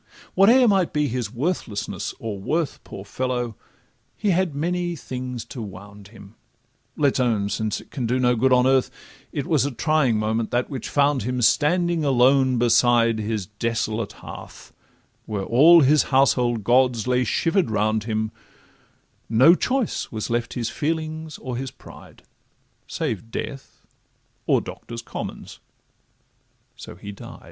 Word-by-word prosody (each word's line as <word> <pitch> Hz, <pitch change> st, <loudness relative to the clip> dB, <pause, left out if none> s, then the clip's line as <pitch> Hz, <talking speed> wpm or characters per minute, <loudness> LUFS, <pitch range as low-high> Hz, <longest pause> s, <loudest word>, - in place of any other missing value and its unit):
Whate'er 235 Hz, +7 st, +6 dB
might 195 Hz, -5 st, +2 dB
be 150 Hz, -1 st, +1 dB
his 120 Hz, -4 st, -3 dB
worthlessness 125 Hz, -, -3 dB
or 105 Hz, -3 st, -5 dB
worth, 155 Hz, -, -2 dB
Poor 95 Hz, -, -9 dB
fellow! 125 Hz, 0 st, -3 dB, 0.6 s
he 205 Hz, -2 st, +1 dB
had 175 Hz, -4 st, 0 dB
many 175 Hz, +3 st, -1 dB
things 125 Hz, -4 st, -6 dB
to 125 Hz, -, -8 dB
wound 100 Hz, 0 st, -10 dB
him. 100 Hz, -1 st, -15 dB, 0.6 s
Let 145 Hz, -3 st, +2 dB
's -, -, -2 dB
own—since 110 Hz, -3 st, 0 dB
it -, -, -20 dB
can 125 Hz, -5 st, -3 dB
do 125 Hz, +2 st, +1 dB
no 125 Hz, -1 st, +3 dB
good 130 Hz, +3 st, +2 dB
on 125 Hz, 0 st, +5 dB
earth— 130 Hz, -1 st, +3 dB, 0.4 s
It -, -, -3 dB
was -, -, +2 dB
a 140 Hz, -, 0 dB
trying 145 Hz, -3 st, +1 dB
moment 110 Hz, +1 st, -1 dB
that 120 Hz, +3 st, -1 dB
which 130 Hz, -4 st, -5 dB
found 145 Hz, -1 st, +2 dB
him 125 Hz, +4 st, -2 dB
Standing 170 Hz, +5 st, +2 dB
alone 130 Hz, -1 st, +3 dB
beside 120 Hz, -1 st, +3 dB
his 105 Hz, -2 st, -2 dB
desolate 110 Hz, +1 st, -3 dB
hearth, -, -, -11 dB, 0.5 s
Where 105 Hz, -2 st, -3 dB
all 155 Hz, -, +6 dB
his 150 Hz, +2 st, +5 dB
household 125 Hz, -4 st, +2 dB
gods 125 Hz, 0 st, +3 dB
lay 125 Hz, 0 st, +2 dB
shiver'd 165 Hz, -, +1 dB
round 110 Hz, 0 st, 0 dB
him: 110 Hz, -1 st, -2 dB, 1.0 s
No 125 Hz, +9 st, +6 dB
choice 255 Hz, +5 st, -1 dB
was 110 Hz, 0 st, -4 dB
left 120 Hz, 0 st, -2 dB
his 120 Hz, -2 st, -2 dB
feelings 155 Hz, 0 st, -3 dB
or 125 Hz, -2 st, -5 dB
his 135 Hz, +1 st, -4 dB
pride, -, -, -15 dB, 0.7 s
Save 115 Hz, -, -3 dB
death 135 Hz, +4 st, -7 dB, 0.6 s
or -, -, +3 dB
Docto 115 Hz, -, -9 dB
125 Hz, 135 wpm, -23 LUFS, 110-150 Hz, 1.0 s, Whate'er